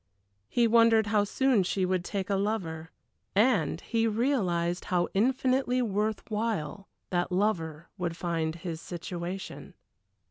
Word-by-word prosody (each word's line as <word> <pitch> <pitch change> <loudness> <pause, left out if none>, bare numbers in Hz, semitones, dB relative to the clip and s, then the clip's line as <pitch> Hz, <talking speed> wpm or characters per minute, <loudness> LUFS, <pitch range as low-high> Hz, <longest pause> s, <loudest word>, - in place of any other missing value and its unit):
He 240 - +3
wondered 230 -1 +5
how 210 -1 +2
soon 260 0 +2
she 185 +1 0
would 185 -1 0
take 195 +1 -3
a - - +3
lover 185 -6 -2 0.5
and 205 - +3
he 230 -1 0
realized 195 -8 0
how 175 -1 +1
infinitely 255 +3 +2
worth 210 0 -1
while 205 -5 -2 0.2
that 175 0 0
lover 170 -5 -1
would 170 -2 -2
find 165 -3 -1
his 170 -1 -6
situation. 175 +2 -6
195 Hz, 130 wpm, -29 LUFS, 175-225 Hz, 0.5 s, wondered